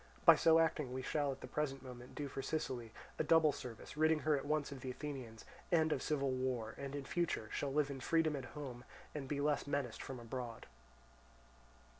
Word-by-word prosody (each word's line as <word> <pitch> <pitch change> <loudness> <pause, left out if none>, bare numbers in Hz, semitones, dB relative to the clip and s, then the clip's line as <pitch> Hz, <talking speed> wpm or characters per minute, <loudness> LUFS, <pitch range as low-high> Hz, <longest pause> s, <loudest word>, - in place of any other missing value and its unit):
By - - +11
so 165 0 +6
acting 155 -5 +2
we 130 0 -3
shall 145 0 +1
at 135 - -7
the - - -6
present 135 -3 -2
moment 125 -1 -9
do 145 - -3
for 135 - -4
Sicily 130 -5 -2 0.3
a - - +3
double 160 0 +6
service, 120 -2 -8
ridding 155 0 +4
her 155 -1 +3
at 140 0 -3
once 150 -1 +1
of 135 -2 -7
the 130 - -4
Athenians, 125 -5 -6 0.3
and 160 -2 +4
of - - +1
civil 140 -3 +1
war, 130 -4 -1
and 140 0 -4
in 140 -1 -4
future 165 -9 -1
shall 140 - -1
live 145 0 +2
in 135 - -5
freedom 160 +3 +2
at 135 -3 -4
home, 125 -4 -6 0.3
and 145 -3 -4
be 140 +1 -1
less 145 -1 +1
menaced 140 -5 -1
from 130 -2 -6
abroad." 120 -1 -5
140 Hz, 205 wpm, -37 LUFS, 130-150 Hz, 0.3 s, By